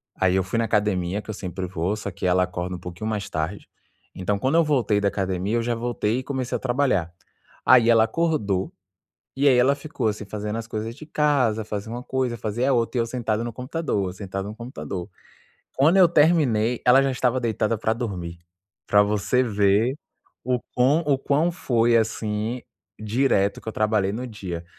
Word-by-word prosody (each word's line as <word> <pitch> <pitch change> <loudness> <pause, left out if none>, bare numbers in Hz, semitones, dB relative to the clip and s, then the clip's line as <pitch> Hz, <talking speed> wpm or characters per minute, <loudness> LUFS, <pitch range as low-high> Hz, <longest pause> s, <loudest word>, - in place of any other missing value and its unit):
aí, 95 -1 +2
eu 95 - +2
fui 95 +5 -2
na 115 - +1
academia 105 -4 0
que 110 - -7
eu - - -5
sempre 95 -2 -5
vou, 90 +2 -2
só 105 -2 -5
que 90 - -3
ela 90 0 +3
acorda 90 0 -4
um - - -8
pouquinho 90 +5 -6
mais 105 -2 -3
tarde, 80 +6 -4 0.5
então, 100 +2 -1
quando 130 +9 0
eu 165 - +5
voltei 125 -9 +1
da 100 - +2
academia, 95 +1 -1
eu 115 - 0
já 120 +1 0
voltei 115 -1 -1
e - - -6
comecei 130 -2 -3
a - - -1
trabalhar. 125 - 0 0.5
Aí, 120 -2 +6
ela 115 -1 +6
acordou, 110 - 0 0.6
e 140 +2 +2
aí, 130 -3 +6
ela 130 +3 +4
ficou, 145 -5 -3
assim, 105 -1 -3
fazendo 105 +2 -4
as 115 0 -6
coisas 110 +1 -4
de 155 - -11
casa, 140 -8 +1
fazia 105 +1 -5
uma 120 +1 -5
coisa, 130 -3 -2
fazia 115 +5 -1
a - - +3
outra. 120 0 0
E - - +4
eu - - 0
sentado 115 -2 -2
no 120 - -4
computador, 125 - -2
eu - - -8
sentado 95 0 -5
no 105 - -7
computador. 110 -6 -6 0.7
Quando 155 +7 +4
eu 185 -2 +8
terminei, 145 -9 +3
ela 130 +2 +7
já 135 - +1
estava 130 0 0
deitada 115 -1 0
pra 110 - 0
dormir. 95 -8 -5 0.5
Pra 100 0 +5
você 105 +5 +1
ver 105 +2 +2 0.5
o 125 -1 0 0.2
quão 130 +6 +4
o 140 -2 +2
quão 145 +5 +1
foi, 120 -7 +2
assim, 110 +1 -1 0.4
direto 110 -2 +1
que - - -9
eu - - -3
trabalhei 105 -3 +1
no 125 +4 -4
dia. 90 -6 -6
110 Hz, 200 wpm, -24 LUFS, 100-125 Hz, 0.7 s, eu